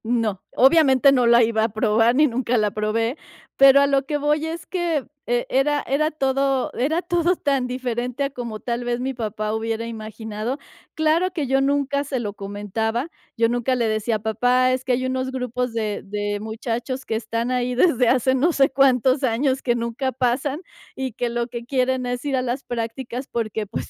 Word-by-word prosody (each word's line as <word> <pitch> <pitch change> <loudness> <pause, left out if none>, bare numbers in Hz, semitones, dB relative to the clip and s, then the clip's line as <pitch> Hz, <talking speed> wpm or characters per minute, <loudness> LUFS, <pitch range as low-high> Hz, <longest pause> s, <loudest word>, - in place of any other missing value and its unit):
No. 225 -4 0
Obviamente, 275 -1 +5
no 250 -3 +3
la 235 0 +6
iba 220 -1 +1
a 225 - +1
probar, 220 +2 +2
ni 300 +3 +5
nunca 250 -2 0
la 210 -1 +1
probé, 225 +5 -1 0.4
pero 275 0 +7
a 280 - +4
lo 275 -1 +1
que 295 +1 -1
voy 295 +2 0
es 325 0 -6
que, 340 -6 -1 0.2
e 240 0 0
era 290 +2 +2
era 300 +3 +1
todo 275 -3 0
era 310 +7 0
todo 345 +1 +1
tan 275 -3 0
diferente 250 +1 -3
a - - -2
como 235 -4 -6
tal 240 +1 -3
vez 240 0 -1
mi 265 +2 -2
papá 215 -2 -3
hubiera 225 +1 -2
imaginado. 220 +1 -5 0.4
Claro 320 +3 +2
que 315 -5 -2
yo 270 +1 +2
nunca 280 0 +1
se 275 -2 -3
lo 210 -4 -4
comentaba, 210 - -3 0.3
yo 230 0 +3
nunca 245 +2 0
le 235 -2 0
decía: 215 +1 0
"Papá, 245 +4 +2
es 255 0 -1
que 260 -1 0
hay 255 +1 0
unos 260 0 -1
grupos 250 -1 -2
de 215 -3 -2
de 205 0 -3
muchachos 235 +4 -4
que 220 - -2
están 230 +2 -2
ahí 250 0 0
desde 255 -3 +3
hace 260 +1 +3
no 280 +7 +2
sé 275 -2 +4
cuántos 265 0 +3
años 260 +2 +1
que 240 -2 +1
nunca 235 +3 -2
pasan, 260 +5 -1 0.3
y 265 -3 -4
que 240 +1 -2
lo 235 0 -1
que 235 -1 -7
quieren 255 -1 0
es 245 +2 -4
ir 280 -2 0
a 255 - +1
las 255 +2 -3
prácticas 240 +2 -5
porque, 220 -2 -3
pues - - -5
250 Hz, 195 wpm, -22 LUFS, 230-270 Hz, 0.4 s, pero